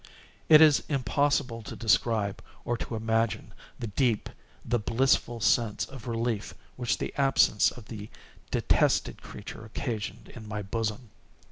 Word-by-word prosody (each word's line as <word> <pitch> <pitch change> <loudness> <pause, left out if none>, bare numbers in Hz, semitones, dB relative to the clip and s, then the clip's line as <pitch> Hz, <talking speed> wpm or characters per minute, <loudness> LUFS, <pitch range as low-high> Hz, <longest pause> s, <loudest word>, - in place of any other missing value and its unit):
It 155 -1 +9
is 155 -2 +7
impossible 140 -3 0
to 105 - -8
describe, 110 -2 +1 0.2
or 120 - 0
to 115 - -5
imagine, 115 0 -1 0.2
the - - -5
deep, 115 +1 0 0.3
the 120 0 +1
blissful 120 +1 +1
sense 115 -1 +2
of 130 -3 -11
relief 115 -2 -2 0.2
which 120 -2 -1
the - - -4
absence 135 -6 +4
of 120 - -12
the 105 -1 -8 0.4
detested - - +1
creature 105 +1 -9
occasioned 110 -1 -5
in 110 -3 -10
my 105 -1 -4
bosom. 110 +2 -3
115 Hz, 135 wpm, -28 LUFS, 110-125 Hz, 0.4 s, It